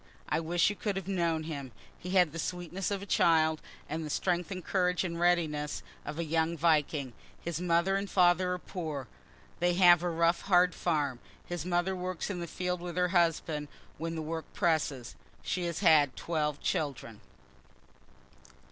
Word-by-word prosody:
I - - +1
wish 170 +4 +2
you - - -5
could 205 -1 -2
have 190 -2 -4
known 170 -4 0
him. 140 -5 -6 0.2
He 180 - -9
had 180 -4 +4
the 165 - -5
sweetness 180 +2 -3
of 200 -1 -3
a - - -6
child, 160 -4 +3 0.3
and 160 +2 -3
the 155 - -5
strength 175 +2 0
and 185 -3 -6
courage 180 -1 +1
and 170 -2 -3
readiness 160 -4 +1 0.2
of 150 - -5
a 170 - -1
young 160 +1 0
Viking. 150 -4 +1 0.3
His 170 -1 -4
mother 175 +2 +2
and 200 0 -2
father 180 0 +3
are - - -2
poor; 155 -8 -5 0.5
they 175 0 +2
have 175 -2 +7
a 175 - -1
rough, 170 +1 +2
hard 180 -2 +4
farm. 145 -7 -1 0.3
His 175 -1 -5
mother 175 +1 +1
works 185 +1 -3
in 180 - -4
the 170 - -4
field 180 +1 -3
with 175 0 -6
her 180 0 +2
husband 165 -4 +1 0.3
when 165 +1 -3
the 160 - -3
work 160 +1 -5
presses. 150 -7 0 0.3
She 180 -1 -2
has 170 +1 -3
had 150 -7 +5
twelve 150 -3 -2
children. 125 -7 -3
170 Hz, 175 wpm, -30 LUFS, 155-180 Hz, 0.5 s, have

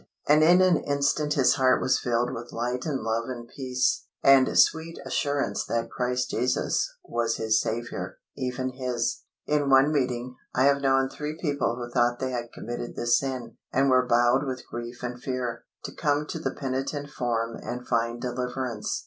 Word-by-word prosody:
And 150 +1 +6
in 175 +3 +6
an 180 -3 +5
instant 145 +1 0
his 135 -3 +4
heart 130 -1 +4
was 130 0 +2
filled 120 0 0
with 120 +1 -7
light 125 +4 -2
and 140 -4 -1
love 115 +2 -1
and 120 -2 -6
peace, 130 -1 -1 0.2
and 135 -1 +5
sweet 160 +1 +3
assurance 145 -1 -1
that 115 0 -2
Christ 125 0 -1
Jesus 125 +3 0
was 115 -1 -1
his 110 0 +2
Saviour, 120 +2 -4 0.2
even 130 0 -2
his. 125 -2 -2 0.2
In 145 -2 +1
one 135 +2 +6
meeting, 125 -3 -1 0.2
I 130 - +3
have 140 0 +4
known 135 -1 +3
three 150 +3 -5
people 145 -7 0
who 120 0 -5
thought 120 -1 +2
they 130 0 -2
had 120 -1 -4
committed 120 +1 -6
this 120 0 +3
sin, 130 -4 -5
and 135 +1 +3
were 125 -1 +4
bowed 120 +3 +4
with 130 -2 -4
grief 120 +1 -7
and 125 0 -5
fear, 125 -3 -3 0.2
to - - -6
come 145 -1 0
to 165 - -4
the 160 - -1
penitent 135 +2 -3
form 115 -3 -1
and 125 +1 -6
find 115 0 0
deliverance. 125 -2 -3
125 Hz, 175 wpm, -26 LUFS, 120-140 Hz, 0.2 s, And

